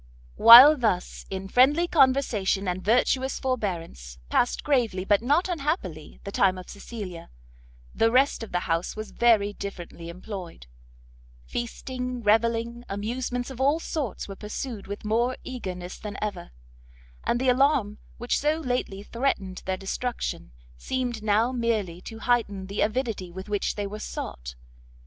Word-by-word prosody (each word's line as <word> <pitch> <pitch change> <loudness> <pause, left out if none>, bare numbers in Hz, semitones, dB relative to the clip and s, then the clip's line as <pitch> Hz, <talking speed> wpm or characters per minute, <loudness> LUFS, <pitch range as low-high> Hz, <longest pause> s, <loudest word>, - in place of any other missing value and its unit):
While 255 +7 +11
thus, 215 -8 -1
in 190 0 -5
friendly 280 - +4
conversation 255 - +2
and 180 +1 -2
virtuous 255 +4 +2
forbearance, 170 - -3
passed 245 - +1
gravely, 230 -10 +1
but 205 +1 +3
not 290 +10 +2
unhappily, 280 - -3
the 200 - -6
time 190 -2 +2
of 185 - -9
Cecilia, 200 -5 -8 0.6
the 225 - +3
rest 260 +3 +3
of 225 - -7
the 180 - 0
house 165 +1 -1
was 215 0 -7
very 215 -4 +3
differently 175 -4 -8
employed; 180 - -8 0.8
feasting, 250 - -5
revelling, 230 +2 +1
amusements 245 +5 -3
of 260 0 -7
all 285 +4 +3
sorts 295 - -4
were 195 - -7
pursued 210 +1 -6
with 205 +1 -7
more 235 +4 +1
eagerness 185 -8 -6
than 210 -2 -6
ever, 210 - -4 0.7
and 240 - 0
the 260 0 +2
alarm 250 -5 +2 0.2
which 240 +1 -1
so 300 +2 +1
lately 245 -8 -2
threatened 205 -6 -2
their 190 0 0
destruction, 195 - -4 0.3
seemed 245 - -3
now 215 +3 +2
merely 220 -8 -1
to 225 - -9
heighten 220 -5 0
the 200 +2 -3
avidity 215 -5 -1
with 190 +3 -8
which 205 -1 -1
they 205 - -3
were 210 +2 -6
sought. 60 - -6
220 Hz, 145 wpm, -26 LUFS, 195-250 Hz, 0.8 s, While